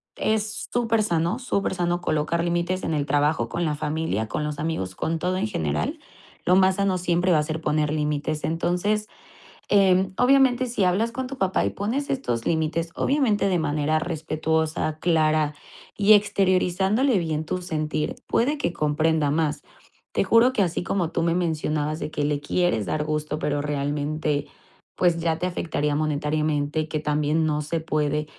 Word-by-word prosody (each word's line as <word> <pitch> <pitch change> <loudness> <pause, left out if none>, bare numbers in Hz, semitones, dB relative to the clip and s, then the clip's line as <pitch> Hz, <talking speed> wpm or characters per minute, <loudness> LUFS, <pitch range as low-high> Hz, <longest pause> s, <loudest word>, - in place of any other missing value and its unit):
es 215 0 -1
supersano, 215 -6 +1
supersano, 180 -7 -1
colocar 155 +1 0
límites 175 +2 -1
en 160 - -1
el 145 -1 0
trabajo, 145 -5 +1
con 175 - -2
la 150 -2 0
familia, 150 -8 -2
con 150 +8 -3
los 150 -1 -4
amigos, 95 - -3
con 165 0 -2
todo 180 +2 -1
en 200 - 0
general. 275 - -2 0.5
Lo 180 - +4
más 190 0 +4
sano, 195 -2 +1
siempre 175 +1 +1
va - - +4
a 150 - +1
ser 155 +1 -4
poner 150 -1 0
límites. 150 0 -1
Entonces, 180 +6 0 0.6
em, 190 -2 +4
obviamente, 255 -1 +4
si 230 -5 -1
hablas 200 +6 +2
con 260 +1 -3
tu 270 +1 -7
papá, 190 -1 +1
y - - +1
pones 240 +8 -3
estos 120 - -2
límites, 165 +1 0
obviamente, 240 -9 +1
de 180 -3 +1
manera 155 0 0
respetuosa, 160 -1 -1
clara, 155 -3 +2 0.4
y 210 +1 +3
exteriorizándole 195 +3 +2
bien 160 -2 -2
tu 180 +3 -3
sentir, 155 -3 -2
puede 285 +6 +1
que 175 -11 -1
comprenda 155 -1 +1
más. 150 -2 0 0.5
Te - - +1
juro 230 +5 +5
que, 210 - +1
así 175 -1 -1
como 175 -2 -1
tú 165 - -1
me 170 0 +1
mencionabas, 155 -2 -1
de - - -4
que 145 - -1
le 145 -1 0
quieres 145 - 0
dar 150 - -1
gusto, 150 0 -2
pero 145 -2 -1
realmente, 145 +1 -2 0.5
pues, 175 -2 +2
ya 165 -1 0
te 180 - -1
afectaría 150 -4 -1
monetariamente, 150 0 0
que 155 -1 -2
también 150 +1 +1
no 150 -1 0
se 160 +2 -2
puede, 150 -1 -1
160 Hz, 165 wpm, -24 LUFS, 150-190 Hz, 0.6 s, juro